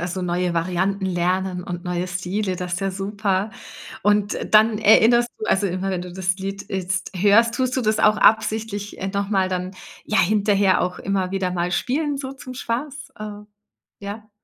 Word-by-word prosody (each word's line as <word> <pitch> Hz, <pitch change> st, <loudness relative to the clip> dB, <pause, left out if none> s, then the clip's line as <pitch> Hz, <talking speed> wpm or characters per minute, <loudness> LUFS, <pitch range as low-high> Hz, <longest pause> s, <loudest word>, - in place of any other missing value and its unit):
Also, 180 Hz, +2 st, -3 dB
neue 180 Hz, 0 st, 0 dB
Varianten 185 Hz, +3 st, -1 dB
lernen 180 Hz, +1 st, -1 dB
und 175 Hz, -1 st, -6 dB
neue 180 Hz, 0 st, -2 dB
Stile, 185 Hz, +2 st, -2 dB
das 180 Hz, -1 st, -3 dB
ist 180 Hz, -, -4 dB
ja 195 Hz, 0 st, -1 dB
super. 195 Hz, +1 st, -1 dB, 0.5 s
Und 205 Hz, 0 st, +2 dB, 0.2 s
dann 215 Hz, 0 st, +5 dB
erinnerst 235 Hz, +3 st, +5 dB
du 440 Hz, -, -4 dB
also, 200 Hz, +1 st, +2 dB
immer, 185 Hz, +2 st, -2 dB
wenn 180 Hz, -2 st, -2 dB
du 180 Hz, -1 st, -8 dB
das 185 Hz, 0 st, 0 dB
Lied 195 Hz, +1 st, -5 dB
jetzt 185 Hz, -2 st, -2 dB
hörst, 210 Hz, +5 st, +4 dB
tust 255 Hz, +1 st, 0 dB
du 255 Hz, -, 0 dB
das 215 Hz, 0 st, +1 dB
auch 215 Hz, 0 st, +5 dB
absichtlich, 215 Hz, -1 st, +1 dB
äh, 195 Hz, -, -2 dB
noch 200 Hz, 0 st, -2 dB
mal 190 Hz, -3 st, +1 dB
dann, 185 Hz, 0 st, -3 dB, 0.3 s
ja, 215 Hz, -, 0 dB
hinterher 200 Hz, -1 st, +3 dB
auch 180 Hz, 0 st, -2 dB
immer 190 Hz, -2 st, -1 dB
wieder 190 Hz, -2 st, -1 dB
mal 175 Hz, 0 st, -1 dB
spielen, 285 Hz, -, -1 dB
so 270 Hz, -1 st, -5 dB
zum 260 Hz, -2 st, -10 dB
Spaß? 275 Hz, +4 st, -4 dB
Äh, 210 Hz, -1 st, -7 dB, 0.6 s
ja? 205 Hz, +2 st, -8 dB
195 Hz, 185 wpm, -22 LUFS, 185-215 Hz, 0.6 s, dann